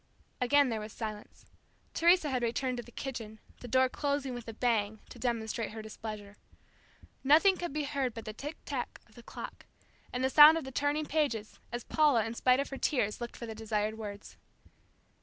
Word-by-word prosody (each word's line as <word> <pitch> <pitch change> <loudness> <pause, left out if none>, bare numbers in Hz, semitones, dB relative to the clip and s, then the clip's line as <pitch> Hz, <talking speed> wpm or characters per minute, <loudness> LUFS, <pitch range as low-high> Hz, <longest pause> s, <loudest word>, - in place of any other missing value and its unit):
Again 280 +2 +4
there 225 -2 -2
was 215 0 -7
silence. 215 -2 -7 0.5
Teresa 340 -3 +4
had 255 -2 0
returned 250 +2 -1
to - - -3
the 240 - -15
kitchen, 230 -5 -6 0.2
the 245 - -8
door 260 +2 +4
closing 280 -1 -2
with 240 -1 -7
a 225 - -5
bang 220 -3 0
to - - -11
demonstrate 230 -2 -2
her 220 -1 -7
displeasure. 215 -2 -8 0.9
Nothing 320 +8 +6
could 350 -3 -4
be 300 +1 -2
heard 275 -4 -2
but 225 - -7
the 215 - -5
tick 295 +8 -7
tack 260 -4 -4
of 215 - -23
the 240 - -13
clock, - - -9 0.4
and 250 +1 -2
the 265 - +2
sound 305 +3 +10
of 325 - -3
the 265 - -7
turning 290 +3 0
pages, 280 -9 -1
as 240 0 -4
Paula, 290 -8 +3
in 225 - -4
spite 255 +2 +3
of 280 - -1
her 270 - -6
tears, 230 -7 0
looked 240 - -6
for 235 - -6
the 225 - -6
desired 215 -1 -2
words. 205 -2 -8
245 Hz, 195 wpm, -31 LUFS, 220-280 Hz, 0.9 s, sound